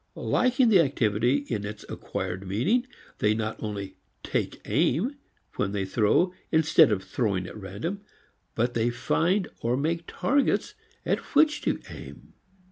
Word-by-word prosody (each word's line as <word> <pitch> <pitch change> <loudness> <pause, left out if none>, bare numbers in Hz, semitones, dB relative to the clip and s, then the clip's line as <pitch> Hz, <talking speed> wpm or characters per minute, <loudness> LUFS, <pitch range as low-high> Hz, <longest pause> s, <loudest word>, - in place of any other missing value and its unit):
Liking 255 -1 +2
the 200 -4 +6
activity 130 -1 +2
in 110 -4 -2
its 105 0 -7
acquired 95 0 -5
meaning, 185 - +1 0.3
they 105 0 +3
not 110 0 -3
only 100 -3 -5 0.3
"take - - -2
aim" 245 - +1 0.4
when 100 -1 0
they 100 -2 -1
throw 115 - +2 0.2
instead 160 -3 +5
of 95 -2 0
throwing 100 -7 -1
at - - -9
random, 105 - -5 0.5
but 120 +2 +1
they 115 0 +1
find 165 +11 +1
or 120 +2 0
make 165 +4 -1
targets 280 +1 +1 0.3
at - - +1 0.2
which 300 +1 +4
to - - 0
aim. - - -11
120 Hz, 140 wpm, -27 LUFS, 105-175 Hz, 0.5 s, the